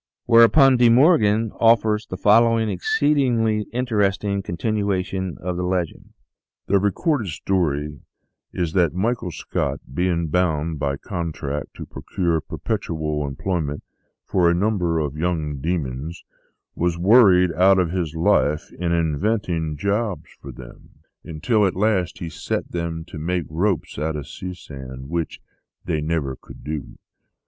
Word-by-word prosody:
Whereupon 125 +3 +6
De 120 -1 +5
Morgan 115 - +4
offers 115 -1 +3
the - - -6
following 115 +1 +4
exceedingly 115 0 +1
interesting 105 -5 0
continuation 95 -2 -2
of 90 0 -3
the 90 - -2
legend: 90 -2 -3 0.3
" - - -70
The 100 0 +3
recorded 110 - 0
story 75 -4 -1 0.5
is 85 -3 -2
that 85 -4 +2
Michael 110 0 -1
Scott, 85 - -3
being 85 0 0
bound 80 -2 0
by 70 -1 -1
contract 75 -5 -5
to - - -7
procure 85 -3 -2
perpetual 75 0 -3
employment 75 0 -3 0.4
for 90 -2 +2
a 85 - +2
num 105 +3 +1
ber 85 -2 0
of 75 -3 -2
young 80 -4 -1
demons, 75 0 -3 0.5
was 85 0 -1
worried 95 -2 +5
out 95 +3 +5
of 90 -3 +1
his 85 -4 -2
life 75 -2 +1
in 85 -1 -2
invent 85 +7 0
ing 80 -3 -2
jobs 100 +3 -2
for 70 - -8
them, - - -13 0.3
until 105 +8 0
at 95 - +1
last 95 -3 0
he 85 - -5
set 80 - -4
them 85 -1 -4
to 85 - -9
make 85 +1 -1
ropes 85 0 -1
out 80 +1 -1
of 75 -3 -5
sea 90 0 -7
sand, 65 -4 -9
which 85 -1 -3 0.5
they 75 - -1
never 75 -4 -1
could - - -14
do. 75 -1 -6
90 Hz, 140 wpm, -22 LUFS, 80-105 Hz, 0.5 s, Whereupon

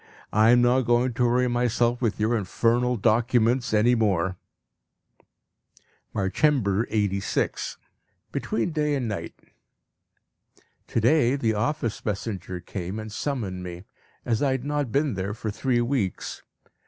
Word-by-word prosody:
I 110 +2 +5
am 120 0 +6
not 125 +2 +4
going 120 +1 +2
to 125 +1 +1
worry 125 +1 +2
myself 120 0 +1
with 115 -4 0
your 110 +3 +2
infernal 115 +4 +1
documents 120 +2 +2
any 110 +3 +4
more. 95 -6 +1 1.8
Marchember 110 +1 +1
86. 100 -3 -1 0.5
Between 115 +10 -1
day 150 -2 0
and 130 -4 -2
night. 105 -2 -5 1.5
To - - 0
day 130 +1 +4
the 115 -5 0
office 115 +2 -2
messenger 100 -3 -4
came 95 +2 -5
and 110 -1 -6
summoned 105 -7 -3
me, 90 0 -7 0.4
as 115 -2 0
I 140 -2 +2
had 130 0 -3
not 145 -4 -1
been 140 0 +1
there 100 +2 -3
for 110 -1 -4
three 120 +3 0
weeks. 120 -7 -2
115 Hz, 130 wpm, -25 LUFS, 105-125 Hz, 1.8 s, am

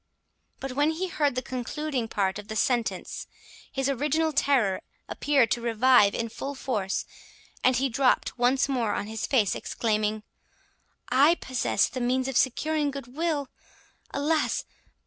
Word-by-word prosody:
But 270 - -5
when 290 +4 +2
he 355 +4 -2
heard 290 -6 0
the 255 - -2
concluding 255 0 -3
part 200 -2 -1
of 210 - -10
the 220 - -5
sentence, 235 0 -1 0.4
his 270 -1 -1
original 300 +4 +1
terror 255 -9 +2 0.3
appeared 275 -6 +2
to 240 - +1
revive 235 -2 +4
in 230 - -1
full 275 +5 -6
force, 210 -8 -2 0.6
and 255 0 +4
he 270 +3 +2
dropt 255 +1 +1
once 250 +3 +2
more 240 -6 0
on - - -2
his 220 0 -4
face, 225 -8 +2
exclaiming, 215 -1 -1 0.9
"I 280 +7 +5
possess 260 -6 0
the 255 - -5
means 255 +2 +1
of 270 - -4
securing 295 +4 +1
good 270 -2 -8
will! 305 -4 -1 0.6
alas! 305 +3 0
260 Hz, 145 wpm, -27 LUFS, 230-285 Hz, 0.9 s, I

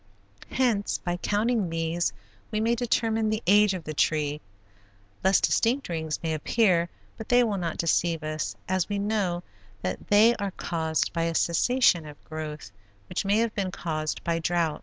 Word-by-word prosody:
Hence, 235 -6 +1
by 175 0 -3
counting 210 0 0
these 165 -2 -1 0.4
we 215 - -1
may 225 +2 +2
determine 225 -2 +1
the 215 +1 -1
age 205 +1 +5
of 180 - -6
the 155 - -5
tree. 150 0 0 0.8
Less 190 +1 +5
distinct 250 +2 +1
rings 160 -2 -2
may 160 -1 0
appear 175 +1 +2 0.3
but 220 - -8
they 245 0 +5
will 210 -4 -1
not 170 -2 -3
deceive 165 -1 +1
us 155 -10 -3
as 185 0 0
we 205 - -1
know 200 -4 -1 0.4
that 90 0 -4
they 220 +3 +6
are 200 -1 -2
caused 160 -3 -2
by 165 -1 0
a 165 0 -2
cessation 175 -2 +3
of 145 -1 -12
growth, 155 -7 -7 0.4
which - - -2
may 200 +2 +3
have 230 -1 +1
been 195 -2 -1
caused 155 -4 -3
by 165 0 0
drouth. 165 -2 0
175 Hz, 170 wpm, -27 LUFS, 160-215 Hz, 0.8 s, they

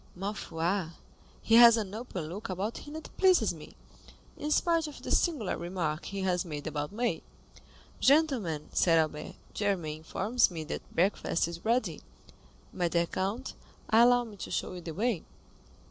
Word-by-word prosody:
"Ma 195 +3 -3
foi, 175 -1 -2 0.6
he 225 - 0
has 235 -1 +9
an 205 -3 -3
open 215 -6 -5
look 185 +7 -6
about 195 +5 -3
him 295 +1 -10
that 315 - -9
pleases 375 -2 +4
me, - - -12 0.6
in 300 - -4
spite 330 +1 +2
of 295 - -9
the - - -5
singular 290 - +1
remark 170 -2 -3
he 200 -1 -4
has 180 -2 +1
made 150 -5 -6
about 150 0 -3
me." 235 +3 -1 0.8
"Gentlemen," 260 - +2
said 165 -2 +4
Albert, 155 -1 -1 0.2
"Germain 180 -7 -1
informs 205 +9 +1
me 165 -3 -5
that 155 - -7
breakfast 175 -2 +1
is 170 0 -8
ready. 235 +3 0 0.7
My 175 - 0
dear 170 0 +1
count, 200 +9 -3 0.4
allow 245 +2 +6
me 215 -3 -11
to - - -7
show - - -2
you 180 - -7
the 165 -2 -7
way." 220 -3 0
195 Hz, 160 wpm, -30 LUFS, 170-240 Hz, 0.8 s, has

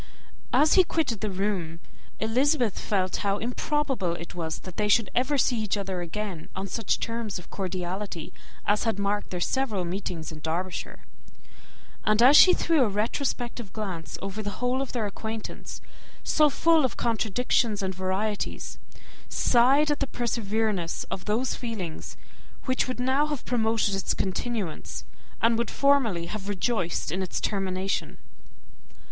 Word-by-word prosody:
As 305 +1 +5
he 375 - +7
quitted 300 - -1
the 215 - -1
room, 185 -4 -2 0.4
Elizabeth 245 +1 +2
felt 185 -3 0
how 200 0 0
improbable 250 - -1
it 170 0 -8
was 160 -2 -3
that 185 -2 -10
they 210 - +1
should 215 +1 +3
ever 260 +4 +2
see 245 -2 +2
each 210 -1 0
other 190 -2 -3
again 175 -1 -5
on 190 - -3
such 200 +2 -1
terms 230 -4 -3
of 180 - -12
cordiality 185 -2 -4 0.3
as 205 +1 +2
had 225 -3 0
marked 205 +1 -1
their 180 - -3
several 215 -2 0
meetings 175 -3 -4
in 155 - -8
Derbyshire; 170 +4 -4 1.0
and 215 0 +3
as 270 +4 +8
she 365 - +10
threw 330 -4 +3
a 225 - +2
retrospective 235 +1 -2
glance 180 -9 -4
over 195 +2 -4
the 205 - -3
whole 250 +2 0
of 275 - -3
their 235 -4 -1
acquaintance, 220 +2 -6 0.4
so 305 -1 +4
full 325 +2 +4
of 255 -5 -1
contradictions 225 -1 +1
and 190 0 -1
varieties, 190 +3 -2 0.5
sighed 270 +5 +4
at 295 - 0
the 275 - 0
perverseness 220 -7 -1
of 185 - -4
those 230 +5 +1
feelings 210 -9 -5 0.5
which 255 -1 +1
would 255 -1 -4
now 265 +4 +2
have 295 -5 -4
promoted 225 -4 +1
its 195 -1 0
continuance, 195 -2 -3 0.4
and 230 0 +4
would 235 - 0
formerly 255 -12 +3
have 200 +2 -5
rejoiced 190 -6 -1
in 185 +3 -1
its 185 - -2
termination. 195 -1 -1
210 Hz, 150 wpm, -27 LUFS, 190-245 Hz, 1.0 s, she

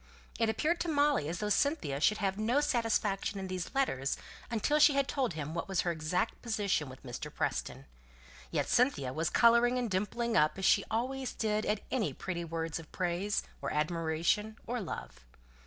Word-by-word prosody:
It 225 -1 +3
appeared 310 +10 +1
to - - -2
Molly 290 - +2
as 170 - -3
though 210 +3 -2
Cynthia 210 - +1
should 215 +6 +4
have 195 -2 0
no 235 +6 +2
satisfaction 225 -7 0
in 190 - -4
these 185 +5 -5
letters, 135 - 0 0.3
until 240 +6 +1
she 300 -1 +7
had 275 -1 +2
told 260 -9 0
him 155 0 -5
what 170 - -3
was 190 -2 +1
her 175 - 0
exact 165 +6 -1
position 205 - 0
with 130 +1 -12
Mr. 120 -2 -6
Preston; - - -3 0.6
yet - - -1
Cynthia 235 - +2
was 160 +2 0
colouring 235 +1 +5
and 240 -4 -1
dimpling 225 +5 -1
up 150 +3 +3
as 190 - -2
she 200 - +5
always 255 +4 -2
did 215 -1 -1
at 210 0 0
any 240 -6 0
pretty 175 -2 -4
words 165 -1 -3
of 160 - -12
praise, 185 +3 -1 0.2
or - - -2
admiration, 165 +7 0
or 245 0 -2
love. - - -7
205 Hz, 185 wpm, -32 LUFS, 165-240 Hz, 0.6 s, she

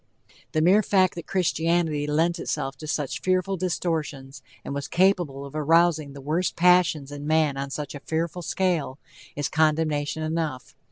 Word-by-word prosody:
The 155 - +2
mere 190 +5 +5
fact 190 -3 +2
that 170 - -8
Christianity 165 -4 0
lent 165 +4 +1
itself 135 -4 -3
to 155 - -8
such 150 -3 -2
fearful 185 +1 +1
distortions, 160 -6 -3 0.2
and - - -4
was 140 0 -4
capable 175 -7 +1
of 140 - -11
arousing 155 -1 +2
the 140 - -10
worst 160 +6 -1
passions 175 -5 +3
in 145 0 -7
man 155 -2 +2
on 140 0 -4
such 145 +1 -5
a 145 - -7
fearful 165 +3 -3
scale, 170 -7 -1 0.4
is 145 -1 -1
condemnation 155 -1 0
enough. 155 -5 -3
155 Hz, 160 wpm, -25 LUFS, 145-175 Hz, 0.4 s, mere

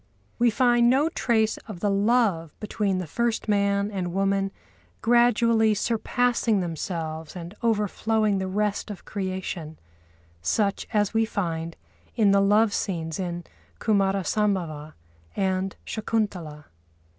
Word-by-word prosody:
We 240 0 +5
find 240 0 +4
no 280 +5 +3
trace 220 -7 +1
of 205 -6 -7
the 205 +2 +1
love 200 -6 +1
between 205 -2 -1
the 185 - -3
first 235 +8 -1
man 200 0 +1
and 185 -3 -3
woman 195 0 +1 0.5
gradually 230 -2 +4
surpassing 235 0 +1
themselves 160 -2 -4
and 175 +1 -7
overflowing 215 -1 +1
the 190 - -2
rest 205 +2 -1
of 205 -4 -8
creation, 185 -5 -4 0.6
such 200 - 0
as 210 -3 +1
we 225 0 +3
find 165 -5 -3 0.4
in 215 -4 +4
the 200 0 +4
love 205 +2 +4
scenes 165 -4 -2
in 175 -2 -3 0.4
Kumâra 195 -3 +1
Sambhava 170 -8 -1 0.4
and 190 -1 -1
Shakuntalâ. 195 -9 -3
200 Hz, 120 wpm, -25 LUFS, 180-220 Hz, 0.6 s, We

